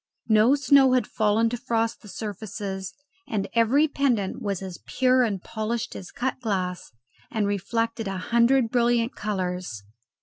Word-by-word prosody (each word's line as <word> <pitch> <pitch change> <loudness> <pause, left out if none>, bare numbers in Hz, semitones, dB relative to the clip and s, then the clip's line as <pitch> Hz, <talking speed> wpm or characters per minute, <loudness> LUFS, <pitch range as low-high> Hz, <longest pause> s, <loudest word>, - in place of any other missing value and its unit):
No 220 +5 +5
snow 275 -1 +5
had 255 - +3
fallen 220 +1 +2
to 245 - -3
frost 230 -1 -1
the - - -14
surfaces, 200 -2 -5 0.3
and 205 -3 -2
every 240 +7 +4
pendant 250 -9 0
was 200 -2 -2
as 185 -2 -7
pure 255 0 +3
and 210 -6 0
polished 220 +1 -3
as 180 - -8
cut 260 +1 -3
glass 185 -6 -3 0.4
and 215 -2 -1
reflected 225 +3 -1
a 195 -1 -3
hundred 235 +4 +2
brilliant 240 -1 +2
colours. 180 - -3
225 Hz, 145 wpm, -25 LUFS, 195-240 Hz, 0.4 s, No